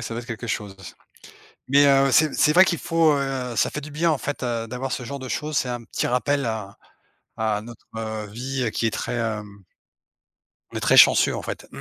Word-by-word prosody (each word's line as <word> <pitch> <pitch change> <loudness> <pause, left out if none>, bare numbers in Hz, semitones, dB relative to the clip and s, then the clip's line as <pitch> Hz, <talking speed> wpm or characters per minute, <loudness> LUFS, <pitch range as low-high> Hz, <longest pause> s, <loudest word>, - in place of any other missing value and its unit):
ça 115 - -5
doit 120 - -3
être - - -14
quelque 115 +1 -6
chose. 105 -3 -4 0.9
Mais, 140 +2 +5
heu, 135 0 +4
c'est 155 +2 +4
c'est 150 - +3
vrai 185 +2 +8
qu'il 170 -4 -1
faut, 165 -2 +2
heu 130 -3 -3
ça - - +2
fait 150 - -5
du 150 - -9
bien 165 +3 +1
en 150 - 0
fait, 145 0 -5
heu, 120 -2 -2
d'avoir 130 +3 -5
ce 125 - -4
genre 140 +4 -6
de 130 - -7
choses. 150 +4 -2
C'est 130 - 0
un 120 -1 -4
petit 115 - -3
rappel 140 +3 0
à 110 -3 -5 0.6
à 110 -2 0
notre, 115 +1 -13
heu, 110 -1 -4
vie 125 +3 -3
qui 115 - -1
est 110 - +1
très, - - -4
hem 105 -4 -4 1.1
on - - -3
est - - -2
très - - +3
chanceux, - - +6
en - - -4
fait. - - -7
125 Hz, 225 wpm, -23 LUFS, 110-140 Hz, 1.1 s, vrai